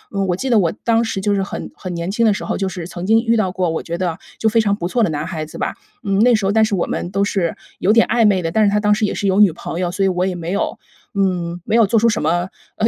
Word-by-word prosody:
嗯， 195 -1 0
我 180 - +1
记 260 +6 -3
得 225 - +5
我 170 -4 +2
当 230 0 +2
时 220 -3 -3
就 205 +1 0
是 195 - +1
很 195 - -5
很 185 - -7
年 170 +3 -3
轻 230 +3 0
的 220 - +5
时 200 - -3
候， - - -2
就 195 -1 -1
是 180 -3 -6
曾 175 +1 -6
经 225 +1 +5
遇 230 -1 +1
到 195 -4 +1
过， 185 -1 -1
我 165 -1 -2
觉 170 0 -5
得 175 -3 -2 0.2
就 220 - 0
非 225 +1 +3
常 200 -2 +1
不 175 -4 -3
错 235 +6 0
的 210 - +3
男 150 0 -3
孩 160 -4 -5
子 - - -10
吧， - - -2 0.3
嗯， 195 -1 0
那 240 +2 +5
时 205 -2 -1
候 195 - +2
但 220 +1 +4
是 215 -2 +1
我 175 - 0
们 175 - -3
都 195 +1 0
是 190 -4 -1 0.2
有 195 - +3
点 230 +1 +5
暧 235 - +2
昧 195 -4 +3
的， 165 - -2
但 220 +5 +2
是 205 - +4
他 210 +1 +1
当 210 0 +3
时 210 - -1
也 - - -2
是 - - -3
有 195 0 +2
女 205 -4 +6
朋 165 +1 -6
友， 180 -1 -1
所 195 +2 0
以 190 - +3
我 180 0 0
也 185 - -2
没 170 0 -5
有， 200 - -1 0.4
嗯， 180 -3 -1
没 220 - 0
有 230 -3 +5
做 225 +1 +3
出 235 - +3
什 220 -2 +1
么， 175 +3 0 0.3
呃， 220 - +1
195 Hz, 355 characters per minute, -19 LUFS, 175-215 Hz, 0.4 s, 女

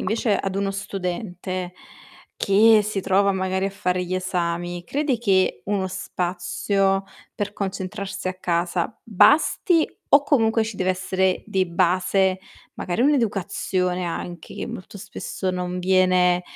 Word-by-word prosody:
invece 220 -1 +1
ad 195 0 -3
uno 195 0 -1
studente, 185 -2 -4 0.6
che 215 +2 +5
si 205 -1 -2
trova 195 +1 +2
magari 190 0 -1
a 195 - -3
fare 180 -2 -1
gli 185 +1 -3
esami, 175 -1 -2
credi 285 - 0
che 190 - +1
uno 200 -1 0
spazio 190 +2 -1 0.3
per 205 0 -3
concentrarsi 195 -1 -4
a 185 - -3
casa 175 +2 -1
basti, 315 - +4 0.2
o 280 - +6
comunque 225 -6 +2
ci 220 -3 -6
deve 185 0 +1
essere 185 0 0
di 190 -1 0
base, 185 +2 +1 0.3
magari, 175 +3 -3
un'educazione 195 -8 0
anche, 170 0 -6
che - - -4
molto 195 +2 -8
spesso 195 -2 -4
non 180 0 -3
viene 180 -1 +3
190 Hz, 130 wpm, -23 LUFS, 180-200 Hz, 0.6 s, o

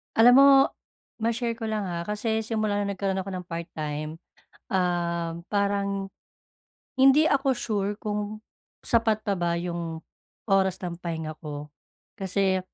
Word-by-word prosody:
Alam 235 +2 +8
mo, 275 - +9 0.7
ma-share 230 +1 -1
ko 225 - -3
lang 215 -1 -1
ha, 170 -1 -4
kasi 220 +1 0
simula 215 -2 -1
na 205 - -1
nagkaroon 190 0 -1
ako 195 +1 -5
ng 180 - -5
part 170 -1 -5
time, 155 0 -4 0.5
um, 170 -2 0
parang, 200 -1 0 1.0
hindi 270 +3 +7
ako 280 -3 +2
sure 205 -4 -1
kung 210 0 -4 0.4
sapat 225 -2 +2
pa 205 - 0
ba 170 -1 0
yung 170 -2 -4 0.4
oras 190 -2 +3
ng 175 -1 -4
pahinga 160 -3 -4
ko 150 0 -6 0.5
kasi 190 -1 +1
195 Hz, 135 wpm, -26 LUFS, 170-220 Hz, 1.0 s, mo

